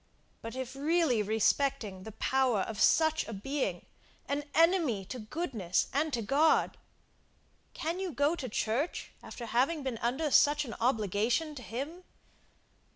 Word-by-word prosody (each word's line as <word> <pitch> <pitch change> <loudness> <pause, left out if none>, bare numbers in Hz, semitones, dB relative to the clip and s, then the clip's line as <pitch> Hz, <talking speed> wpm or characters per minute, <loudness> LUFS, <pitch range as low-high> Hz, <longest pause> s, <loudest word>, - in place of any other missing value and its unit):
but 230 +2 -7
if 260 0 -5
really 300 -4 +2
respecting 220 0 0
the 220 - -8
power 255 -3 +1
of 215 +2 -4
such 315 -1 +3
a 225 - -6
being, 270 +8 -3 0.4
an 285 +1 -1
enemy 325 - +3
to 255 - -6
goodness 215 - -2
and 300 +3 +1
to 235 -4 -1
God, 290 +8 +3 1.0
can 330 +3 -3
you 380 -2 -3
go 290 +3 +1
to 260 -7 -5
church 230 +9 -2
after 240 - -8
having 270 +7 +1
been 255 -4 -3
under 265 +6 -1
such 295 +2 +4
an 230 - -6
obligation 230 - +1
to 275 - -8
him. 280 - -6
265 Hz, 145 wpm, -31 LUFS, 225-305 Hz, 1.0 s, such